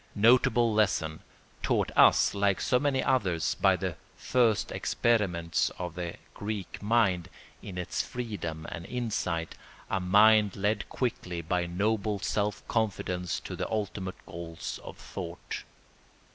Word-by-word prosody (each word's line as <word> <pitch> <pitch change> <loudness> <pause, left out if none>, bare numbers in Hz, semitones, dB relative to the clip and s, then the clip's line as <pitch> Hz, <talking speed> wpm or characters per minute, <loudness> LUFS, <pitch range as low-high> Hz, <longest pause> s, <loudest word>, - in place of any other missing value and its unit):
Notable 115 +1 +4
lesson, 95 -7 +1 0.4
taught - - +1
us - - +6
like 100 -2 +2
so 125 - +2
many 140 -2 +1
others 95 -11 +1
by - - +3
the - - -3 0.2
first 120 -5 +2
experiments 95 -8 +1
of 90 -2 -4
the 85 0 -4 0.2
Greek 105 -2 -5
mind, 100 -5 +2 0.3
in 90 - -8
its 90 - -1
freedom 85 -10 -5
and 85 - -6
insight, 105 -9 -2 0.4
a 95 - +1
mind 105 +2 +5
led 105 +1 -1
quickly 90 -9 -3
by 90 +2 0
noble 105 +3 0
self 105 +1 -2
confidence 90 -5 -1
to - - -6
the - - -3
ultimate 100 -3 -3
goals 85 -1 -6
of - - -9
thought. 85 -2 -7
100 Hz, 130 wpm, -29 LUFS, 90-110 Hz, 0.4 s, us